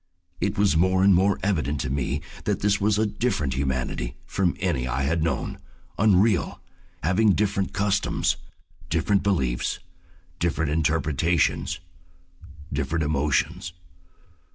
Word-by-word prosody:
It -, -, -1 dB
was 100 Hz, -4 st, +3 dB
more 95 Hz, +3 st, +3 dB
and 100 Hz, 0 st, +6 dB
more 95 Hz, +3 st, +3 dB
evident 75 Hz, -7 st, 0 dB
to 65 Hz, -, -3 dB
me 70 Hz, -1 st, -1 dB, 0.2 s
that -, -, 0 dB
this 100 Hz, 0 st, +2 dB
was 105 Hz, 0 st, +2 dB
a 110 Hz, -, +2 dB
different 100 Hz, -, -1 dB
humanity 65 Hz, -2 st, -2 dB
from 95 Hz, -3 st, 0 dB
any 80 Hz, -9 st, 0 dB
I 65 Hz, +2 st, -1 dB
had 80 Hz, +4 st, 0 dB
known, 80 Hz, -, -2 dB, 0.4 s
unreal, 100 Hz, -1 st, +3 dB, 0.4 s
having 100 Hz, +6 st, +3 dB
different 100 Hz, -2 st, 0 dB
customs, 100 Hz, 0 st, +1 dB, 0.5 s
different 85 Hz, +5 st, +2 dB
beliefs, 65 Hz, -12 st, 0 dB, 0.6 s
different 80 Hz, -3 st, 0 dB
interpretations, 80 Hz, 0 st, +1 dB, 0.9 s
different 75 Hz, +3 st, -1 dB
emotions. 80 Hz, +4 st, 0 dB
85 Hz, 120 wpm, -25 LUFS, 75-100 Hz, 0.9 s, and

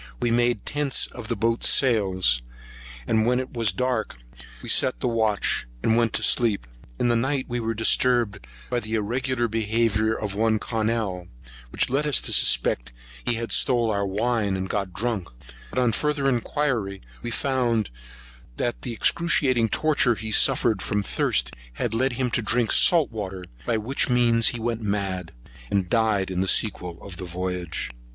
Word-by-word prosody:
We 120 Hz, -, 0 dB
made 120 Hz, -2 st, +1 dB
tents 145 Hz, -2 st, +1 dB
of 120 Hz, -3 st, -10 dB
the 115 Hz, -, -1 dB
boats' 115 Hz, +2 st, +1 dB
sails; 95 Hz, -, +3 dB, 0.6 s
and 110 Hz, +6 st, +1 dB
when 125 Hz, +1 st, +2 dB
it 130 Hz, -, -6 dB
was 115 Hz, -4 st, 0 dB
dark, 115 Hz, -, -2 dB, 0.5 s
we -, -, -8 dB
set 130 Hz, -, +3 dB
the 125 Hz, -, -1 dB
watch, 110 Hz, -, +1 dB, 0.2 s
and 110 Hz, -, +2 dB
went 115 Hz, -1 st, +2 dB
to -, -, +1 dB
sleep. 110 Hz, -, +3 dB, 0.3 s
In -, -, +1 dB
the 120 Hz, -, +2 dB
night 130 Hz, +3 st, -1 dB
we 120 Hz, -1 st, -3 dB
were 115 Hz, 0 st, -3 dB
disturbed 115 Hz, -, +2 dB, 0.2 s
by 120 Hz, -, +1 dB
the 110 Hz, -1 st, -4 dB
irregular 120 Hz, +3 st, -1 dB
behaviour 110 Hz, 0 st, 0 dB
of 105 Hz, -2 st, -4 dB
one 110 Hz, +1 st, +1 dB
Connell, 110 Hz, -5 st, -2 dB, 0.4 s
which -, -, +1 dB
led 145 Hz, +3 st, 0 dB
us 145 Hz, -, +4 dB
to -, -, 0 dB
suspect -, -, +3 dB, 0.3 s
he 120 Hz, -, 0 dB
had 115 Hz, 0 st, -5 dB
stole 120 Hz, -3 st, +2 dB
our 100 Hz, -1 st, -1 dB
wine, 105 Hz, 0 st, -1 dB
and 95 Hz, 0 st, -4 dB
got 100 Hz, -1 st, -3 dB
drunk; 100 Hz, -2 st, -3 dB, 0.4 s
but, -, -, -9 dB
on 125 Hz, -2 st, +2 dB
further 145 Hz, +3 st, -1 dB
inquiry, 120 Hz, -6 st, -1 dB, 0.2 s
we 120 Hz, -, -4 dB
found 120 Hz, -, 0 dB, 0.7 s
that 120 Hz, -, -2 dB
the 120 Hz, -, -5 dB
excruciating 130 Hz, -4 st, +2 dB
torture 145 Hz, -5 st, +2 dB
he 110 Hz, 0 st, -6 dB
suffered 115 Hz, -3 st, +4 dB
from 105 Hz, -1 st, -1 dB
thirst -, -, 0 dB, 0.4 s
led 125 Hz, +3 st, 0 dB
him 125 Hz, 0 st, -2 dB
to -, -, 0 dB
drink 115 Hz, +1 st, +1 dB
salt 165 Hz, -7 st, +5 dB
water; 95 Hz, -4 st, -6 dB, 0.2 s
by 115 Hz, -, +1 dB
which 125 Hz, +6 st, 0 dB
means 120 Hz, -2 st, +3 dB
he 120 Hz, -, +1 dB
went 115 Hz, 0 st, -3 dB
mad, 95 Hz, -4 st, -3 dB, 0.4 s
and 95 Hz, -3 st, -1 dB
died 110 Hz, -5 st, +1 dB
in 90 Hz, 0 st, -1 dB
the 95 Hz, -, -1 dB
sequel 90 Hz, -5 st, +1 dB
of 95 Hz, -3 st, -8 dB
the 90 Hz, -, -6 dB
voyage. 90 Hz, -4 st, -4 dB
115 Hz, 170 wpm, -24 LUFS, 100-120 Hz, 0.7 s, salt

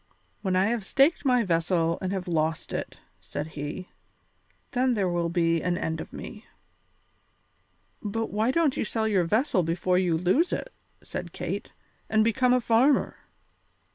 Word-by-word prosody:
"When 190 Hz, -2 st, 0 dB
I 185 Hz, +1 st, +4 dB
have 225 Hz, 0 st, 0 dB
staked 275 Hz, -, +3 dB
my 250 Hz, -3 st, +4 dB
vessel 165 Hz, -2 st, +1 dB
and 185 Hz, -, -2 dB
have 190 Hz, -2 st, -3 dB
lost 160 Hz, -2 st, -1 dB
it," -, -, -5 dB, 0.2 s
said 150 Hz, -, -5 dB
he, 150 Hz, +5 st, -6 dB, 0.8 s
"then 255 Hz, -1 st, +2 dB
there 200 Hz, -3 st, +1 dB
will 175 Hz, -1 st, 0 dB
be 165 Hz, -1 st, +1 dB
an 175 Hz, 0 st, 0 dB
end 160 Hz, -1 st, -2 dB
of -, -, -9 dB
me." 220 Hz, -1 st, -9 dB, 1.5 s
"But 225 Hz, +1 st, -3 dB
why 215 Hz, +3 st, +1 dB
don't 300 Hz, 0 st, +2 dB
you -, -, -1 dB
sell 220 Hz, 0 st, -1 dB
your 195 Hz, -5 st, +2 dB
vessel 215 Hz, -, +2 dB
before 180 Hz, +2 st, +1 dB
you 175 Hz, -3 st, +1 dB
lose 185 Hz, -, +2 dB
it," -, -, -4 dB, 0.3 s
said -, -, -6 dB
Kate, -, -, -4 dB, 0.4 s
"and 220 Hz, 0 st, +4 dB
become 250 Hz, +3 st, +2 dB
a 250 Hz, -, +5 dB
farmer?" 245 Hz, +4 st, +3 dB
190 Hz, 160 wpm, -27 LUFS, 170-240 Hz, 1.5 s, a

